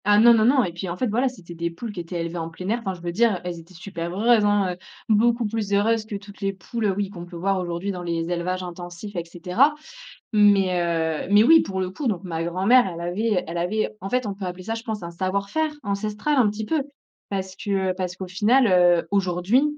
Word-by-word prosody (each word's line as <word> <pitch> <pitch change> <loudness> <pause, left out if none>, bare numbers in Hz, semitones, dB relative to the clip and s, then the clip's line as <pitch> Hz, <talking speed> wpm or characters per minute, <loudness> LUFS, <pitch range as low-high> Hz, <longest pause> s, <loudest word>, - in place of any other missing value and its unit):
Ah 205 +1 +5
non, 235 +2 +8
non, 220 -1 +4
non 260 +1 +5
et 175 - -3
puis 175 +2 -5
en 170 - -4
fait 255 - 0
voilà, 245 +5 +1
c'était 185 -9 -12
des 170 0 -2
poules 215 +7 -7
qui 200 - -7
étaient 175 +1 -5
élevées 170 +1 -4
en 165 0 -4
plein 185 +3 -8
air 230 +2 +1
enfin 195 -5 -4
je 175 - -14
veux 175 0 -3
dire, 215 0 +2
elles 175 -1 -5
étaient 170 +3 -16
super 170 -1 -5
heureuses, 230 0 +4
hein, 205 -3 +2 0.3
beaucoup 230 +2 +3
plus 210 -1 -2
heureuses 215 +2 +2
que 215 - -6
toutes 200 +1 -10
les 195 0 0
poules 210 +3 -2
oui, 200 -1 -2
qu'on 175 -3 -8
peut 175 - -11
voir 190 +3 0
aujourd'hui 175 +2 -3
dans 180 -2 -5
les 170 -1 -2
élevages 180 +1 -2
intensifs 175 +3 -8
et 170 - -2
cetera, 180 - +2 0.6
mais 200 -4 +4
heu, 165 -2 -1
mais 205 +1 +7
oui 325 +5 +8
pour 190 -1 -3
le 185 -1 -2
coup 270 +9 -5
donc 200 -6 -1
ma 165 -2 -3
grand-mère 195 +8 +4
elle 170 -1 -7
avait 185 +3 0
elle 170 +1 -4
avait 210 +7 -1
en 195 - -5
fait, 250 +1 0
on 205 - -2
peut 195 -1 -6
appeler 180 0 -6
ça, 225 - -2
je 230 0 -7
pense 220 -4 -4
un 170 - -5
savoir-faire, 200 - -1
ancestral, 210 +7 -1
un 245 -5 +5
petit 210 +1 -4
peu. 310 +5 0 0.5
Parce 190 -1 -4
que, 200 - -6 0.2
heu, - - -1
parce 180 -1 -3
qu'au 190 -1 -6
final, 225 +7 +3
heu, 175 -2 +4
aujourd'hui, 195 +6 +2
195 Hz, 245 wpm, -24 LUFS, 175-215 Hz, 0.6 s, non